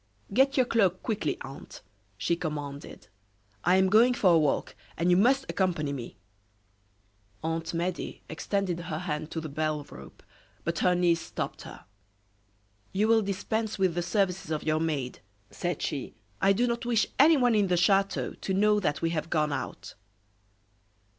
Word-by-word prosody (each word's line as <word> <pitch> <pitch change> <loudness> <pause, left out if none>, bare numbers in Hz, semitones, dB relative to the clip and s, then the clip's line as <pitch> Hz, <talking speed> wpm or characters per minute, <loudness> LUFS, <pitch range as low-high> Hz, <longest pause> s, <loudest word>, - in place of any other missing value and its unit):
"Get 270 +4 +3
your 255 - +5
cloak, 195 -6 +1
quickly, 210 - -1
aunt," 135 +1 -10 0.3
she 140 +11 0
commanded. 145 -4 -6 0.6
"I 180 +2 +4
am 190 0 +4
going 230 +5 +5
for 185 -7 +4
a - - +6
walk, 150 -3 0 0.2
and 175 +2 +2
you - - +6
must 265 +7 +3
accompany 165 -7 0
me." 120 -7 -7 1.3
Aunt 165 +1 -2
Medea 175 +1 -3
extended 180 +2 -2
her 165 -3 -4
hand 155 -3 -4
to 165 - -4
the 160 - -5
bell 155 0 -2
rope, - - -12 0.4
but 170 0 -2
her 180 -1 +3
niece 170 -2 +2
stopped - - -5
her. - - -11 1.1
"You 205 +3 +1
will 225 -1 +5
dispense 215 +2 -2
with 190 -3 +2
the 175 - -1
services 190 -2 0
of 155 -1 -2
your 155 0 +1
maid," 145 -6 -2 0.3
said 175 -3 -3
she. 140 -3 -4 0.3
"I 195 - +5
do 235 +5 +2
not 235 -1 -1
wish 235 -2 +2
anyone 275 -5 +6
in 205 -2 +3
the 180 -1 +2
chateau 195 +3 +2
to 190 - -4
know 210 +1 +4
that 150 -5 -1
we 165 - +1
have 165 0 -3
gone 150 -3 +1
out." - - -5
180 Hz, 165 wpm, -28 LUFS, 155-205 Hz, 1.3 s, a